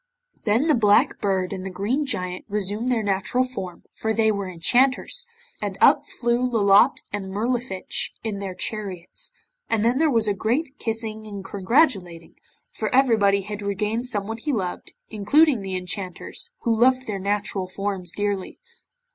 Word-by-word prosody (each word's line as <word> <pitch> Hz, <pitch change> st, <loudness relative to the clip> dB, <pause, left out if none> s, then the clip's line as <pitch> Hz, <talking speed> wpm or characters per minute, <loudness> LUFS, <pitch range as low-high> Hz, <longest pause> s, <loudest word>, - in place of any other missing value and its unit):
Then 225 Hz, +6 st, +3 dB
the 315 Hz, -, +4 dB
Black 210 Hz, -4 st, +3 dB
Bird 190 Hz, -2 st, 0 dB
and 185 Hz, -1 st, -5 dB
the 190 Hz, -, -4 dB
Green 230 Hz, +11 st, -1 dB
Giant 185 Hz, -7 st, -2 dB
resumed 210 Hz, +4 st, -1 dB
their 230 Hz, -3 st, +1 dB
natural 205 Hz, +5 st, +1 dB
form, 190 Hz, -9 st, -7 dB
for 220 Hz, 0 st, -2 dB
they 220 Hz, -1 st, +3 dB
were 200 Hz, -2 st, -3 dB
enchanters, 255 Hz, -, +2 dB, 0.3 s
and -, -, -3 dB
up -, -, +5 dB
flew 240 Hz, 0 st, 0 dB
Lolotte 225 Hz, -1 st, +4 dB
and 205 Hz, -2 st, -3 dB
Mirlifiche 230 Hz, -1 st, -1 dB
in 215 Hz, -3 st, -3 dB
their 195 Hz, -2 st, -5 dB
chariots, 195 Hz, -6 st, -5 dB, 0.4 s
and 225 Hz, -1 st, +1 dB
then 245 Hz, +3 st, +2 dB
there 320 Hz, 0 st, +4 dB
was 230 Hz, -5 st, +2 dB
a 205 Hz, -, +2 dB
great 260 Hz, -, -1 dB
kissing 220 Hz, -1 st, -3 dB
and 200 Hz, -2 st, -7 dB
congratulating, 195 Hz, -, +1 dB, 0.4 s
for -, -, -3 dB
everybody 220 Hz, -7 st, +4 dB
had 210 Hz, +1 st, -6 dB
regained 210 Hz, +4 st, -1 dB
someone 220 Hz, -1 st, -2 dB
he 295 Hz, +6 st, -2 dB
loved, 190 Hz, -8 st, -3 dB, 0.2 s
including 250 Hz, +5 st, +3 dB
the 190 Hz, -1 st, -4 dB
enchanters, 185 Hz, -, -5 dB
who 230 Hz, -1 st, +1 dB
loved 255 Hz, +3 st, +3 dB
their 205 Hz, -4 st, -3 dB
natural 200 Hz, -1 st, -1 dB
forms 190 Hz, -2 st, -3 dB
dearly. 205 Hz, -1 st, -3 dB
210 Hz, 155 wpm, -24 LUFS, 195-240 Hz, 0.4 s, up